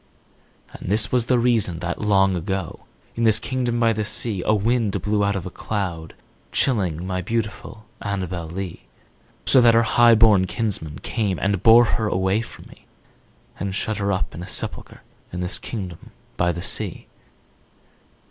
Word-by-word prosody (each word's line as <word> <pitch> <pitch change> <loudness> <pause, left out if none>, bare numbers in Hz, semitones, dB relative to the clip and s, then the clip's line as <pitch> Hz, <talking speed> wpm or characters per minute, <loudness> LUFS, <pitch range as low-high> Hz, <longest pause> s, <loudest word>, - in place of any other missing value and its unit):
And - - -6
this 105 +1 +2
was 125 -2 +2
the 125 0 +2
reason 115 -8 +2
that, 85 +1 -4
long 95 -2 +3
ago, 90 0 -4 0.3
In 115 - -1
this 110 -2 +5
kingdom 120 0 -2
by 115 -1 +3
the 110 0 -2
sea, 105 -2 -3
A 110 - +4
wind 110 0 +1
blew 105 0 +1
out 100 0 +1
of 95 - -4
a 95 - -6
cloud, 85 -6 -4 0.4
chilling 90 - 0
My 95 0 -2
beautiful 110 0 -4 0.2
Annabel 95 -4 -3
Lee; 90 +1 -6 0.6
So 130 - +5
that 115 -1 +6
her 115 - +5
highborn 115 -5 +5
kinsman 90 -10 -2
came 105 -5 -1
And 100 -2 0
bore 115 +1 +7
her 110 -2 0
away 95 +2 +1
from 110 - -11
me, - - -18 0.7
To 95 +1 -2
shut 105 +2 -2
her 100 -1 0
up 95 - -2
in 85 - -7
a 90 - -7
sepulchre - - -4 0.3
In 90 - -4
this 90 +1 -2
kingdom 95 -7 -7 0.3
by 85 0 +1
the 85 +1 -5
sea. - - -4
100 Hz, 165 wpm, -22 LUFS, 90-115 Hz, 0.7 s, bore